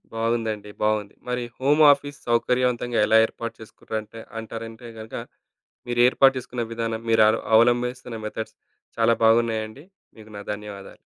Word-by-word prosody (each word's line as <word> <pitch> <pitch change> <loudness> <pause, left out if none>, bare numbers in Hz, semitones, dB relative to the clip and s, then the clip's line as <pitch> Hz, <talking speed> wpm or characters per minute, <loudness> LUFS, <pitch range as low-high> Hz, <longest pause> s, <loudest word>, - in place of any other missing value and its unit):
బాగుందండి. 115 -2 -2
బావుంది. 105 -1 0
మరి 125 0 -1 0.2
హోమ్ 145 +4 +3
ఆఫీస్ 145 0 -1
సౌకర్యవంతంగా 120 0 +1
ఎలా 110 - +5
ఏర్పాటు 115 0 -7
చేసుకున్నారంటే 110 0 -7 0.2
అంటారంటే 115 +1 -8
గనక, 110 +1 -9 0.7
మీరు 120 0 0
ఏర్పాటు 135 +1 +4
చేసుకున్న 125 -1 -4
విధానం, 115 -1 -3
మీరు 110 -1 +6
అలు 110 - +1 0.2
అవలంభిస్తున్న 120 0 +1
మెథడ్స్ 110 +1 -6 0.4
చాలా 115 0 +4
బాగున్నాయండి. 115 +2 +1 0.3
మీకు 110 -1 -14
నా - - -7
ధన్యవాదాలు. 100 -1 -10
115 Hz, 130 wpm, -24 LUFS, 110-120 Hz, 0.7 s, మీరు